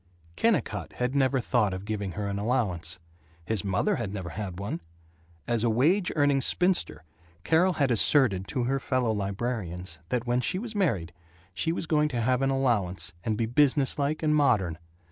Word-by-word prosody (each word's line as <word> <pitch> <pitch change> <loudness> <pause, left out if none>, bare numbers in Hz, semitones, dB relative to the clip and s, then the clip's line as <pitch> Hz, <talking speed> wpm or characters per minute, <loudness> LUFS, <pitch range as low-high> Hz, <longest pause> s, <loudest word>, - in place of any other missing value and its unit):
Kennicott 225 -8 0
had 125 +1 -2
never 135 -1 +2
thought 110 -6 +1
of 95 +2 -7
giving 100 -3 -3
her 105 +1 -3
an 100 0 -3
allowance. 105 -8 -1 0.5
His 105 -1 -1
mother 100 - +1
had 110 -5 -3
never 95 -4 -5
had 95 -1 -5
one! 100 -4 -4 0.7
As 120 -2 0
a 120 - +3
wage 165 - +2
earning 145 -2 +3
spinster 180 - 0 0.4
Carol 175 - +3
had 140 -5 +1
asserted 110 -5 +3
to 125 +7 -2
her 135 +3 0
fellow 130 -3 0
librarians 95 -5 -3
that 125 -1 -1
when 120 +1 +1
she 180 - 0
was 225 +3 -4
married, 115 - 0 0.4
she 95 - 0
was 170 - -2
going 150 -1 +2
to 120 -4 -2
have 125 +2 +1
an 135 - +2
allowance 115 -11 0
and 110 -2 -1
be 115 - +1
business 140 +4 +2
like 145 +3 -1
and 150 -1 +3
modern. 105 - +2
120 Hz, 180 wpm, -27 LUFS, 100-140 Hz, 0.7 s, a